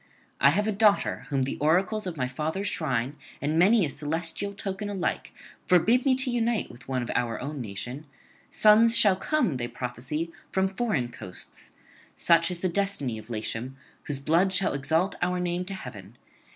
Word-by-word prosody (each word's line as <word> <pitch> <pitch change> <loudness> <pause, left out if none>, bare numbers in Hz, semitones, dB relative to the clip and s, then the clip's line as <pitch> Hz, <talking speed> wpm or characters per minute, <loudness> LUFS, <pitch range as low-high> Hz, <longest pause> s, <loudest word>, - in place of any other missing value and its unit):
I 140 - +6
have 200 +8 +1
a - - +2
daughter 205 0 +2
whom 135 -3 +1
the 130 - -3
oracles 185 +7 +1
of 170 -3 -5
my 125 -2 0
father's 155 +9 -3
shrine 130 0 -2 0.2
and 155 +3 0
many 200 +2 +5
a - - -3
celestial 165 +7 -3
token 200 +1 -4
alike 195 -3 -2 0.4
forbid 225 - +4
me 260 - +5
to 260 0 +1
unite 235 - -1
to - - -17
one 130 -2 -1
of 120 - -4
our 120 -2 -1
own 145 0 -5
nation; 125 +7 -7 0.4
sons 225 +2 +5
shall 205 -4 +6
come, 195 - 0
they 120 -1 -2
prophesy, 130 +8 -4 0.2
from 190 0 +1
foreign 195 - -1
coasts, 90 - -10 0.4
such 165 -1 +3
is 175 -2 -4
the 185 - +1
destiny 170 - -1
of 110 +2 -13
Latium, 115 +3 -4 0.3
whose 145 - -1
blood 165 +7 +2
shall 190 0 +1
exalt 160 +7 +1
our 180 0 0
name 180 0 -1
to 195 +1 -6
heaven. 110 - -10
165 Hz, 180 wpm, -27 LUFS, 135-195 Hz, 0.4 s, I